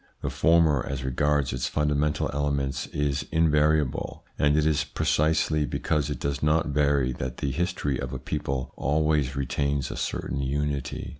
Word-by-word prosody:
The - - -1
former, 80 -5 +3
as 70 0 -4
regards 70 +1 +1
its 60 0 -1
fundamental 75 +2 0
elements, 70 -1 -1
is 70 -1 -1
invariable, 75 -3 +1
and 75 0 +2
it 75 - +2
is 75 -1 +2
pre 75 +1 -4
cisely 75 0 +2
because 75 -3 -1
it 75 - -4
does 70 0 -2
not 75 +1 +2
vary 70 -3 +2
that 65 0 -5
the 70 - -2
history 85 -5 -1
of - - -4
a 65 - -3
people 65 +1 -3
always 75 -2 +1
retains 70 0 -1
a - - -5
certain 70 - -3
unity. 70 0 -2
75 Hz, 160 wpm, -26 LUFS, 70-75 Hz, -, former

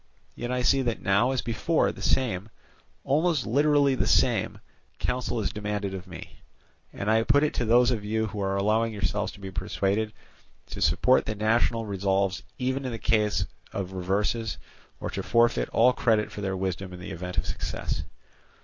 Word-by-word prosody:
Yet 120 - -5
I 125 0 0
see 135 +2 +4
that 120 -3 -2
now 100 +5 +3
as 130 -2 -1
before 125 +8 +1
the - - -11
same, 110 -6 0 0.5
almost 155 0 +1
literally 145 +2 +3
the 130 - 0
same, - - +2 0.4
counsel 125 -1 -2
is 100 - -2
demanded 105 -2 -3
of 95 0 -7
me; 90 - -10 0.5
and 100 - -5
I 110 +1 +4
put 145 +5 +3
it 150 - +1
to 120 - -1
those 120 +2 +5
of 110 -4 -2
you 110 +1 0
who 105 -1 -5
are 95 0 0
allowing 110 +3 +1
yourselves 100 0 -1
to - - -14
be 95 -1 -7
persuaded, 100 +3 -1 0.6
to - - -6
support 95 - +3
the 110 - -2
national 115 +2 +1
resolves 95 -1 0 0.2
even 130 +2 -1
in 130 - -3
the 115 - -4
case 105 -2 +1 0.3
of 95 -1 -4
reverses, 100 +5 -1 0.4
or - - -4
to - - -3
forfeit 115 0 +2
all 125 +3 +4
credit 110 -4 +1
for 105 - -7
their 95 -1 -2
wisdom 95 0 -3
in 90 - -9
the 90 - -7
event 90 +2 -6
of - - +1
success. - - -3
110 Hz, 185 wpm, -27 LUFS, 100-120 Hz, 0.6 s, those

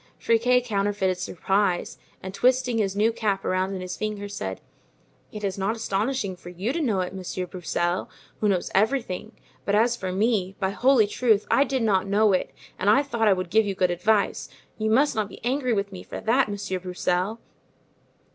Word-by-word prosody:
Friquet 245 +2 +3
counterfeited 200 -4 0
surprise, 185 0 -1 0.2
and 190 0 -6
twisting 250 +1 +2
his 195 -2 0
new 215 +3 +3
cap 215 -4 -1
around 185 +1 0
in 185 - -5
his 185 0 -5
fingers, 205 -1 -4
said: 95 - -4 0.7
"It 210 -1 -8
is 195 -1 -2
not 200 +4 0
astonishing 215 -1 -1
for 175 - -11
you 190 +8 -3
to 335 - -1
know 215 -10 +1
it, 180 0 -4
Monsieur 185 -1 -4
Broussel, 175 0 -2 0.3
who 210 - +2
knows 185 -3 0
everything; 220 -1 0 0.3
but 200 - +1
as 235 +3 +3
for 185 -5 -4
me, 195 -1 0
by 190 -2 0
holy 245 +2 +4
truth, 215 0 +2
I 275 - +5
did 265 -3 -1
not 195 -3 +2
know 205 +1 +3
it 185 - 0 0.3
and 200 - +2
I 245 +7 +5
thought 235 -6 0
I 205 - +6
would 185 -2 -4
give 220 +1 +4
you 195 - -2
good 185 -1 +2
advice; 200 +4 +1 0.3
you 220 0 -1
must 270 +7 +3
not 215 -2 -1
be - - -11
angry 255 0 0
with 200 -2 0
me 185 - -8
for - - -7
that, 240 +1 +2
Monsieur 200 -2 -3
Broussel." 180 +3 -1
205 Hz, 195 wpm, -25 LUFS, 185-225 Hz, 0.7 s, I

